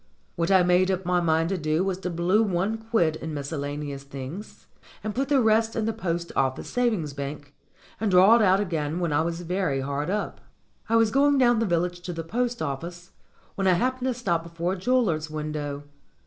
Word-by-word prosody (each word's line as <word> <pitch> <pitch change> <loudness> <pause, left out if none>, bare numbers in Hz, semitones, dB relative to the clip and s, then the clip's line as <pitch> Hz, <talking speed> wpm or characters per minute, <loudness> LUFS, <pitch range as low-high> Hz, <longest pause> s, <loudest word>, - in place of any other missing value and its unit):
What 170 0 -1
I 190 -2 +5
made 180 +1 +3
up 190 -1 -1
my 180 0 +2
mind 165 0 +1
to 190 -1 -1
do 155 +2 0
was 190 -1 -2
to 185 - -3
blue 175 +5 +2
one 200 +2 0
quid 220 -9 +1
in 160 -1 -6
miscellane 145 0 -4
ous 135 - -7
things, 140 +8 -9 0.4
and 215 - -3
put 270 +4 -1
the 285 -2 +4
rest 225 -1 +2
in 225 - 0
the 225 - 0
Post 170 -5 -3
Office 130 -1 0
Savings 215 - 0
Bank 145 +1 -7 0.5
and 220 - 0
draw 190 +4 +7
it 235 - +4
out 190 -2 +4
again 165 -4 -2
when 170 -4 -1
I 145 - +3
was 170 +1 -3
very 175 -6 -1
hard 140 +3 -3
up. 210 +2 -3 0.5
I 230 - +2
was 225 -1 +4
going 280 +2 +4
down 240 -3 +4
the 225 - +1
village 175 0 0
to 175 0 -5
the 165 0 -5
post 240 +6 -2
office, 170 +5 -6 0.4
when 195 -1 -1
I 185 - +5
happened 255 +7 0
to 255 - 0
stop 175 -9 0
before 170 +2 -3
a - - -2
jeweller's 185 -7 +1
window. 150 -2 -4
175 Hz, 210 wpm, -25 LUFS, 155-215 Hz, 0.5 s, draw